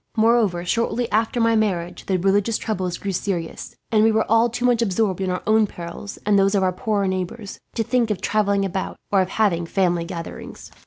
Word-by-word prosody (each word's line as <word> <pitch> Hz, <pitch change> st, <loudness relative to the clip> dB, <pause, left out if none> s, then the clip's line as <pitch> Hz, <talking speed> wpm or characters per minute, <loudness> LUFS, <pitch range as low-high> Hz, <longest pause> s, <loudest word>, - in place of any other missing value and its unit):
Moreover, 220 Hz, -6 st, +3 dB
shortly 235 Hz, +4 st, 0 dB
after 225 Hz, +3 st, +1 dB
my 230 Hz, 0 st, +3 dB
marriage 185 Hz, -6 st, -1 dB
the 190 Hz, -, +1 dB
religious 200 Hz, +4 st, +1 dB
troubles 185 Hz, -5 st, -3 dB
grew 200 Hz, -, -4 dB
serious; 175 Hz, -3 st, -4 dB, 0.2 s
and 215 Hz, -1 st, +4 dB
we 225 Hz, -, +5 dB
were 220 Hz, 0 st, +2 dB
all 230 Hz, +2 st, +4 dB
too 245 Hz, +2 st, -3 dB
much 240 Hz, -2 st, +3 dB
absorbed 195 Hz, -3 st, 0 dB
in 190 Hz, -, -1 dB
our 180 Hz, 0 st, -2 dB
own 215 Hz, 0 st, +4 dB
perils, 175 Hz, +3 st, -8 dB
and 205 Hz, -1 st, +4 dB
those 195 Hz, +1 st, +3 dB
of 195 Hz, -, +2 dB
our 185 Hz, -1 st, +1 dB
poorer 200 Hz, +1 st, -1 dB
neighbours, 190 Hz, +3 st, -4 dB, 0.2 s
to 225 Hz, -, 0 dB
think 240 Hz, 0 st, +1 dB
of 210 Hz, -4 st, -1 dB
travelling 200 Hz, -2 st, +1 dB
about, 190 Hz, 0 st, -3 dB, 0.2 s
or 195 Hz, -2 st, +4 dB
of 185 Hz, -, -1 dB
having 175 Hz, -7 st, +1 dB
family 175 Hz, -2 st, +1 dB
gatherings. 170 Hz, -1 st, -8 dB
200 Hz, 205 wpm, -22 LUFS, 185-220 Hz, 0.2 s, we